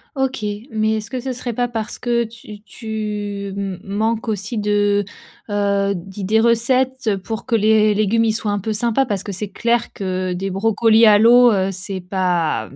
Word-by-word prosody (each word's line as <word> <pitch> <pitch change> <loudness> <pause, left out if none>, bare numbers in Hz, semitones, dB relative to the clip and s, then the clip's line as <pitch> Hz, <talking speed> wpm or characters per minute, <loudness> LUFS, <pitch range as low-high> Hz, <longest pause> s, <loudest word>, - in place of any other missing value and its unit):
OK, 265 -5 -1 0.3
mais 220 0 +1
est-ce 215 0 -4
que 260 -1 -4
ce 260 +1 -4
serait 245 0 -4
pas 245 +2 -1
parce 225 -2 -5
que 235 -1 +1
tu 220 -2 -11
tu 210 -2 -5
m 195 -2 -4
manques 220 +3 -1
aussi 210 +2 -3
de, 205 -1 +1 0.5
heu 200 -1 +1
d'idées 195 +4 -2
recettes 235 -1 +1
pour 220 +4 -5
que - - -4
les 215 0 +4
légumes 215 +2 +2
ils 220 - +2
soient 215 -1 -1
un 205 - -1
peu 220 +3 -3
sympas 235 +5 +1
parce 200 -5 -3
que 200 - -5
c'est 200 +2 -4
clair 235 +3 0
que 185 -1 -3
des 190 +2 -3
brocolis 225 +3 +3
à 210 -1 +7
l'eau, 240 +2 +6
heu, 190 -2 +1
c'est 190 +1 -4
pas 180 - -1
215 Hz, 185 wpm, -19 LUFS, 200-230 Hz, 0.5 s, à